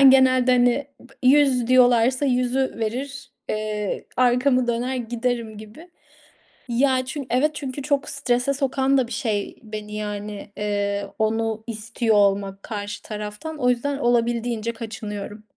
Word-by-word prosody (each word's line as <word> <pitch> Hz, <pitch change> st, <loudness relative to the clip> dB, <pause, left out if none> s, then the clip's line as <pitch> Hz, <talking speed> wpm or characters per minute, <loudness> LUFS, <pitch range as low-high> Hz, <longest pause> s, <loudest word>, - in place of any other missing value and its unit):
ben 270 Hz, -1 st, +9 dB
genelde, 255 Hz, -1 st, +5 dB
hani, 245 Hz, +3 st, +3 dB
bı 265 Hz, +2 st, -18 dB
100 260 Hz, -2 st, +4 dB
diyorlarsa 250 Hz, +1 st, +4 dB
100'ü 255 Hz, +1 st, +1 dB
verir. 255 Hz, +6 st, -4 dB, 0.2 s
Eee, 215 Hz, -1 st, -2 dB
arkamı 250 Hz, +1 st, +3 dB
döner 245 Hz, +2 st, -1 dB
giderim 235 Hz, -2 st, -2 dB
gibi. 220 Hz, +12 st, -12 dB, 0.8 s
Ya, 255 Hz, +1 st, +2 dB
çün 270 Hz, 0 st, -5 dB
evet, 260 Hz, +6 st, +2 dB
çünkü 280 Hz, -2 st, -5 dB
çok 280 Hz, 0 st, 0 dB
strese 245 Hz, +2 st, 0 dB
sokan 270 Hz, 0 st, +1 dB
da 255 Hz, -, +1 dB
bir 240 Hz, -, -14 dB
şey 210 Hz, -6 st, -2 dB
beni, 210 Hz, -1 st, -7 dB
yani, 210 Hz, -1 st, -5 dB
eee, 200 Hz, -1 st, -1 dB
onu 220 Hz, 0 st, 0 dB
istiyor 225 Hz, 0 st, -1 dB
olmak 200 Hz, -1 st, +2 dB
karşı 205 Hz, -2 st, -5 dB
taraftan. 210 Hz, +9 st, -6 dB
O 250 Hz, -3 st, +2 dB
yüzden 275 Hz, +3 st, 0 dB
olabildiğince 235 Hz, -2 st, 0 dB
kaçınıyorum. 210 Hz, -2 st, -7 dB
240 Hz, 135 wpm, -23 LUFS, 215-260 Hz, 0.8 s, ben